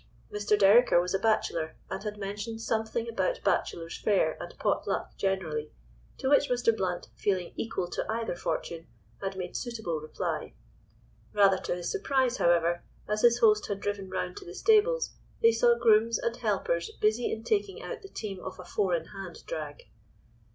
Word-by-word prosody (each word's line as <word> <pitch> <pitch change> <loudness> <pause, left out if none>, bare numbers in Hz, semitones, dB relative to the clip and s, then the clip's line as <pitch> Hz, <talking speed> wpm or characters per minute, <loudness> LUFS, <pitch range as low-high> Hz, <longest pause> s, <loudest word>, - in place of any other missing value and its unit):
Mr. 210 0 +2
Dereker 205 0 +6
was 180 +1 -1
a 195 - +2
bachelor, 170 -7 0 0.2
and - - -3
had 210 0 -5
mentioned 205 +3 -5
something 225 +1 -1
about - - -1
bachelor's 165 0 0
fare 205 -2 +2
and - - -8
pot - - 0
luck - - -2
generally, 165 -6 -2 0.5
to - - -2
which 285 +1 +4
Mr. 240 -2 +2
Blount, 185 -4 -2
feeling 185 -3 -1
equal 225 -5 -2
to - - -3
either 225 -4 -2
fortune, 165 -1 -3 0.3
had 195 -1 -3
made 180 -1 -5
suitable 220 -10 -3
reply. 155 - -4 0.8
Rather 195 -2 +5
to - - -2
his 175 -1 -3
surprise, 270 - +1
however, 170 0 +3 0.3
as 210 0 0
his 235 0 +6
host 215 -2 +5
had 200 -1 -3
driven 200 -2 -3
round 180 -1 -3
to - - -8
the 175 - -10
stables 465 +3 +3 0.3
they 230 - +8
saw 235 +1 +4
grooms 230 0 +4
and 235 0 -2
helpers 190 -6 0
busy 215 +3 +2
in 220 - -4
taking 405 - -1
out - - -6
the 390 - -11
team 200 - -5
of 190 +1 -7
a 180 - -10
four 180 0 +1
in 165 -1 -3
hand 195 -3 -9
drag. - - -5
210 Hz, 175 wpm, -29 LUFS, 180-230 Hz, 0.8 s, they